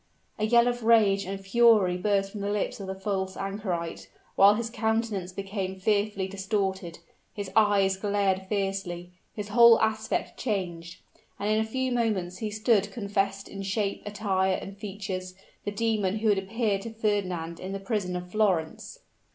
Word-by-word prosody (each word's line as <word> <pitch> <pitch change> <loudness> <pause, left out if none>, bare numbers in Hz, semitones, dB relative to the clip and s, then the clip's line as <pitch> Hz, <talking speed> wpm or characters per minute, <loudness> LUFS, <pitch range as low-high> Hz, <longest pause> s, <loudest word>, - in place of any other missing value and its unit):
A 215 - +1
yell 235 +1 +5
of 245 0 -1
rage 215 -4 +4
and 195 +1 -4
fury 200 -2 +4
burst 195 +1 0
from 205 - -6
the 200 - -2
lips 205 0 -2
of 195 - -6
the 190 - -4
false 190 -1 -3
anchorite, 175 - -4 0.3
while 200 +1 +7
his 230 +1 -3
countenance 220 -5 -1
became 195 0 -4
fearfully 205 -1 0
distorted 190 -3 -2 0.4
his 200 -2 -5
eyes 200 -3 +4
glared 195 -2 0
fiercely 195 -3 -3 0.2
his 210 -1 -5
whole 235 +1 +7
aspect 220 0 -1
changed 175 -7 -3 0.4
and 205 +1 -1
in 215 - +3
a - - +2
few 260 +2 -1
moments 200 -7 -1
he 215 - -2
stood 210 -1 +2
confessed 195 -2 -2
in 195 - -7
shape, 200 +1 -1
attire 195 -2 0
and 195 - -8
features, 190 -3 -5 0.3
the 205 - -1
demon 210 -2 0
who 220 0 +1
had 200 -2 +3
appeared 205 0 -1
to 230 - -6
Fernand 185 -7 -2
in 185 - -6
the 195 - -4
prison 195 -3 -2
of 180 0 -6
Florence! 190 -7 -1
200 Hz, 165 wpm, -27 LUFS, 190-215 Hz, 0.4 s, while